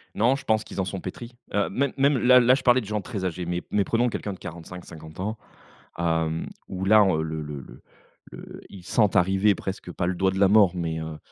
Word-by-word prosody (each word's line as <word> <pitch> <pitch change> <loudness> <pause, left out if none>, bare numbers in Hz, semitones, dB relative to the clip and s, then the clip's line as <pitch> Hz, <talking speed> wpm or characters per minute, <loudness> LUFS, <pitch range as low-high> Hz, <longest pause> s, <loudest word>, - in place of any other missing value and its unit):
Non, 120 +5 +3
je 140 - -9
pense 110 0 +2
qu'ils - - -8
en - - -2
sont 95 +1 -5
pétris, 120 +7 -8 0.2
heu, 105 - +1
même 140 +6 -1
même 140 +1 +3
là, 125 +1 +6
là, 125 +1 +5
je 135 - -4
parlais 125 0 +4
de - - -9
gens 105 +1 -2
très 100 -3 -5
âgés 90 0 -3
mais 90 +1 -2
mais 105 - +2
prenons 120 +4 +1
quelqu'un 105 -3 -4
de 95 - -12
45-50 85 -2 -10
ans, 105 +4 -3 0.6
hem, 80 -1 -1 0.2
où 95 0 -4
là, 105 +1 +6
heu, 90 -5 +1
le 80 0 -4
le 75 -2 -6
le - - -14 0.5
le - - -10
ils 95 -3 -12
sentent 105 0 +2
arriver 95 +3 +3
presque 95 -2 -6
pas 85 - -2
le 90 - 0
doigt 95 +2 +1
de 95 - -4
la 100 - +6
mort, 100 -3 +5
mais 85 -2 -3
heu, 80 -1 -6
95 Hz, 240 wpm, -25 LUFS, 85-110 Hz, 0.6 s, là